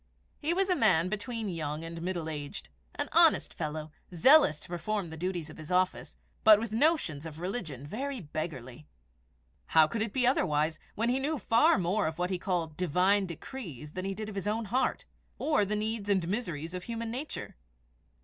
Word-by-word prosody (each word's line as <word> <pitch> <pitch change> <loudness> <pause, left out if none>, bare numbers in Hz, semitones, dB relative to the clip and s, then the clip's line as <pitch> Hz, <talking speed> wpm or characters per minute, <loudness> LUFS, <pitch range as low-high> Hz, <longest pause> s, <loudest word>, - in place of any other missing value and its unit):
He 305 - 0
was 380 +2 +2
a - - +4
man 185 - +3
between 220 +2 -3
young 155 -3 -3
and 165 0 -6
middle 175 -2 -3
aged, 150 +2 -6 0.3
an - - -2
honest 335 -1 +4
fellow, 155 -1 -4 0.2
zealous 180 - +6
to - - -9
perform 180 +1 -3
the - - -6
duties 170 -2 -3
of - - -13
his 155 +1 -8
office, 185 0 0 0.3
but 215 -1 +8
with 225 -1 -4
notions 225 - +1
of 160 -1 -8
religion 175 - -4
very 265 - -4
beggarly. 150 - -6 0.8
How 160 -1 +6
could 220 +8 -3
it 220 -1 -1
be 255 +2 +1
otherwise 155 - +2 0.2
when 230 +2 +1
he 255 +2 +2
knew 300 +3 -1
far 230 -3 +4
more 185 +2 +1
of 160 - -4
what 180 +1 -1
he 185 - -1
called 175 -4 -1
the 180 +4 -3
Divine 190 +5 +3
decrees 165 - -8
than 185 +3 -5
he 195 0 -2
did 215 +1 -5
of 215 - -6
his 195 0 -4
own 220 +2 0
heart, 260 - +1 0.3
or 300 -10 +2
the 210 +2 -1
needs 215 -1 -2
and 190 -4 +2
miseries 170 -6 -3
of 180 0 -5
human 230 -1 -4
nature? 270 +6 -5
185 Hz, 195 wpm, -30 LUFS, 160-225 Hz, 0.8 s, but